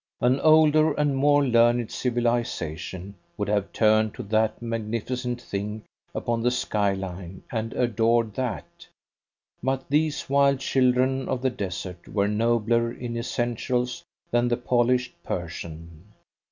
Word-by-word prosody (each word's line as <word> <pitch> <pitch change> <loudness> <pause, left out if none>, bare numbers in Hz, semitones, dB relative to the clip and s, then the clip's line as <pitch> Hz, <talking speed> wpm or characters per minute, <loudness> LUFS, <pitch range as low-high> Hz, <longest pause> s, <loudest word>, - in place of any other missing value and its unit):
An 125 +3 +2
older 155 0 +5
and 145 -1 +1
more 145 +1 +4
learned 120 -1 +3
civilisation 115 -7 -2 0.2
would 105 -1 -2
have 100 -2 0
turned 110 -1 +3
to - - -6
that 110 +1 +1
magnificent 115 +2 -3
thing 105 -1 -5 0.3
upon 115 -1 -1
the 120 - +3
skyline 95 -6 -2
and 115 -1 -2
adored 115 -2 +1
that. 125 -6 -5 0.7
But 130 +1 -1
these 150 0 +1
wild 140 -1 +3
children 130 0 +1
of 130 0 -2
the 130 - +2
desert 90 -5 -6
were 100 -1 0
nobler 115 +2 +1
in 120 -1 -6
essentials 120 +1 -2 0.3
than 120 0 +2
the 120 -1 +1
polished 125 0 +1
Persian. 85 -1 -6
120 Hz, 125 wpm, -25 LUFS, 105-125 Hz, 0.7 s, older